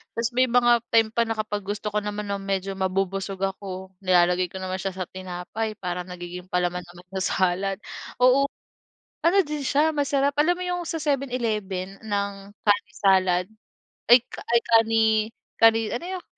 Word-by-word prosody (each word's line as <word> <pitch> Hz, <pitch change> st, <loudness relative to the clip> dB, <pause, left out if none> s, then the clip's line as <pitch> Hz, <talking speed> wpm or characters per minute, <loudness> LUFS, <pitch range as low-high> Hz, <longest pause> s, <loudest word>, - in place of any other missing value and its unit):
tas 230 Hz, 0 st, 0 dB
may 255 Hz, 0 st, +4 dB
mga 240 Hz, 0 st, +4 dB, 0.2 s
time 225 Hz, -1 st, +4 dB
pa 235 Hz, +1 st, +2 dB
na 225 Hz, -, -1 dB
kapag 210 Hz, -2 st, -3 dB
gusto 205 Hz, +1 st, -3 dB
ko 210 Hz, -, +1 dB
naman 210 Hz, 0 st, -4 dB
nang 200 Hz, 0 st, -2 dB
medyo 195 Hz, 0 st, -2 dB
mabubusog 195 Hz, 0 st, -1 dB
ako, 190 Hz, -1 st, -4 dB
nilalagay 180 Hz, -1 st, +3 dB
ko 185 Hz, -, -9 dB
naman 185 Hz, 0 st, -3 dB
siya 195 Hz, 0 st, -3 dB
sa 185 Hz, -, -3 dB
tinapay 185 Hz, +4 st, -5 dB
para 180 Hz, -3 st, -4 dB
nagiging 180 Hz, 0 st, -8 dB
palaman 180 Hz, 0 st, -1 dB
naman 175 Hz, +1 st, -15 dB
sa -, -, -3 dB, 0.2 s
salad. 190 Hz, +2 st, 0 dB, 0.4 s
Oo, 260 Hz, +2 st, +5 dB, 0.8 s
ano 345 Hz, +4 st, +4 dB
din 295 Hz, -1 st, -4 dB
siya 300 Hz, +4 st, +3 dB
masarap. 280 Hz, 0 st, +1 dB
Alam 345 Hz, +4 st, +4 dB
mo -, -, -3 dB
'yung 355 Hz, 0 st, -2 dB
sa 325 Hz, -, -3 dB
7-Eleven 220 Hz, -10 st, -2 dB
ng 200 Hz, -2 st, -1 dB, 0.3 s
kani 205 Hz, 0 st, +2 dB
salad, 185 Hz, -3 st, +3 dB, 0.7 s
ay 245 Hz, -, +10 dB, 0.3 s
ay 235 Hz, -, +6 dB
kani 225 Hz, 0 st, +5 dB, 0.6 s
kani, 225 Hz, 0 st, +6 dB, 0.2 s
ano 335 Hz, -, -5 dB
'yun, 360 Hz, -, -11 dB
200 Hz, 165 wpm, -25 LUFS, 185-235 Hz, 0.8 s, ay